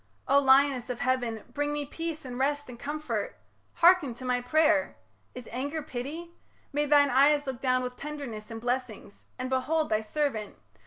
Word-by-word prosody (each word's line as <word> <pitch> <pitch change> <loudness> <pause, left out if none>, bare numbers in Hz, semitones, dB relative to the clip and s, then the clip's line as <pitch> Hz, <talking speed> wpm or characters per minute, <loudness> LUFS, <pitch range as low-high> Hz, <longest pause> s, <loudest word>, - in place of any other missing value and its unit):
O 275 +1 +5
lioness 270 -2 +4
of 250 - -4
heaven, 245 -4 0
bring 290 0 -1
me 295 0 -2
peace 320 +1 -5
And 250 -1 -6
rest 290 +1 0
and 240 -1 -10
comfort. 300 +3 -3 0.4
Hearken 340 -8 +4
to 255 - -9
my 250 -1 +1
pray'r! 310 +2 +2 0.4
Is 250 -2 -8
anger 285 +6 -3
pity? 300 +6 -6 0.4
May 295 +1 +1
thine 285 -1 +5
eyes 290 +3 +4
look 265 -2 -5
down 255 -1 +2
With 250 0 -5
tenderness 275 -8 -6
and 225 -1 -6
blessings, 245 -4 -4
and 255 0 -3
behold 295 +5 0
Thy 215 0 +1
servant. 220 -2 -2
270 Hz, 170 wpm, -28 LUFS, 250-295 Hz, 0.4 s, O